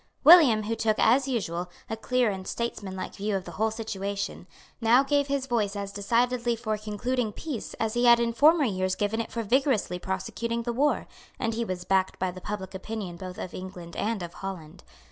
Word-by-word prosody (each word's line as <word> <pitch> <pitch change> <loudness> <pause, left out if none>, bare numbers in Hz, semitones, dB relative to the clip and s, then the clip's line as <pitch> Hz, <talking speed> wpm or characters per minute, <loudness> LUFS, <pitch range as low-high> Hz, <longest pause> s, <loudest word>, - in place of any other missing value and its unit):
William, 295 -11 +8
who 225 +2 -2
took, 220 -1 +1
as 260 +4 +4
usual, 180 -8 -2 0.2
a 225 - -3
clear 245 +1 +1
and 190 -1 -6
statesmanlike 200 -5 -4
view 205 +1 -2
of 190 - -2
the 175 - -7
whole 220 +7 0
situation, 200 -3 -4 0.3
now 235 +4 +5
gave 285 0 +1
his 280 -1 -1
voice 220 -5 0
as 200 -1 -4
decidedly 235 +4 +1
for 220 -1 -2
concluding 215 +3 -2
peace 275 +1 -6
as 220 -1 -1
he 240 +1 +2
had 235 0 +7
in 235 0 0
former 305 +5 +5
years 185 -4 0
given 210 +2 0
it - - -7
for 230 - -2
vigorously 235 -6 +1
prosecuting 230 +5 -3
the 240 0 -2
war; 285 +5 +1 0.3
and 225 -2 -1
he 230 +1 -1
was 185 -5 -4
backed 190 -1 +1
by 185 -1 -1
the 185 +1 -10
public 200 -2 -5
opinion 190 -2 -5
both 185 +1 -8
of 180 - -6
England 180 -2 -8
and 215 -3 -1
of 170 0 -7
Holland. 180 -3 -8
215 Hz, 200 wpm, -27 LUFS, 190-235 Hz, 0.3 s, William